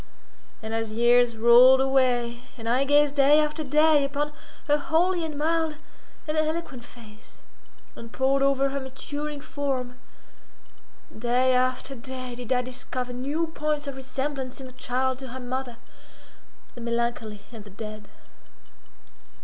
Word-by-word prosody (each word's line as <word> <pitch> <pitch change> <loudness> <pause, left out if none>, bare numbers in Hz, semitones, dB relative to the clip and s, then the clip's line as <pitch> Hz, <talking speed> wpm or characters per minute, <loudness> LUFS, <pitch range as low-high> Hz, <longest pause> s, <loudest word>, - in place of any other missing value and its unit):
And 220 0 -5
as 225 -1 -2
years 240 +1 +3
rolled 240 +3 +7
away, 250 -3 +1 0.2
and 225 -1 -7
I 255 +4 +2
gazed 290 0 +4
day 285 +2 +6
after 305 +1 -1
day 300 +1 +4
upon 290 +2 -2 0.3
her 295 0 +4
holy, 340 +4 +1
and 310 -2 -5
mild, 320 +1 0 0.5
and 305 - -1
eloquent 310 -5 -2
face, 220 -3 -15 0.5
and 230 0 -10
poured 270 +2 +1
over 275 0 +2
her 275 +1 -3
maturing 285 +3 -6
form, 265 -4 -3 1.2
day 245 +3 +2
after 255 +2 0
day 255 0 -7
did 245 0 -8
I 250 -1 +2
discover 250 0 -5
new 285 +7 -1
points 300 -2 -2
of 280 -1 -5
resemblance 265 0 -4
in 265 - -8
the 255 - -10
child 255 +1 -1
to 265 - -8
her 260 +1 -7
mother, 250 -1 -5 1.0
the 240 - -10
melancholy 235 -3 -2
and 225 -3 -10
the 205 - -13
dead. 215 +1 -8
260 Hz, 140 wpm, -26 LUFS, 240-290 Hz, 1.2 s, rolled